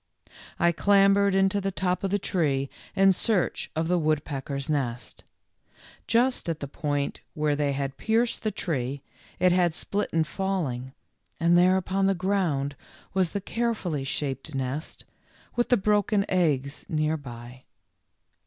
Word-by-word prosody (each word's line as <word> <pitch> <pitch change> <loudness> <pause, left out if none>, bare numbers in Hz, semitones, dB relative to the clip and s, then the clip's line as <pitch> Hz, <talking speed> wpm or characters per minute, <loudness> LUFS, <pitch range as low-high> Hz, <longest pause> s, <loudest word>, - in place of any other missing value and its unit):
I 170 - +4
clambered 200 +2 +4
into 195 +1 +2
the 195 - -1
top 185 -1 -1
of 195 - 0
the 200 - +2
tree 145 -9 0 0.2
in 195 0 +6
search 190 0 0
of 160 +1 0
the 180 0 +2
woodpeckers' 145 -3 -2
nest. 130 -6 -3 0.8
Just 245 -5 +2
at 165 -1 -2
the 140 - -5
point 145 -1 -2
where 150 -1 +1
they 145 -1 0
had 135 0 -3
pierced 230 +2 +1
the 215 - 0
tree 140 -9 -3 0.3
it 180 0 +4
had 175 -2 +2
split 205 +3 -2
in 165 -1 +2
falling, 155 -8 -3 0.5
and 170 +1 +4
there 180 +2 +5
upon 190 +1 0
the 195 - +2
ground 175 -7 0 0.4
was 190 -3 +2
the 200 - -2
carefully 215 - -2
shaped 135 +1 -3
nest, 135 +4 -4 0.5
with 240 0 +1
the 245 - +5
broken 205 0 +2
eggs 145 -6 0
near 155 0 +1
by. 125 -3 -10
170 Hz, 145 wpm, -26 LUFS, 140-195 Hz, 0.8 s, in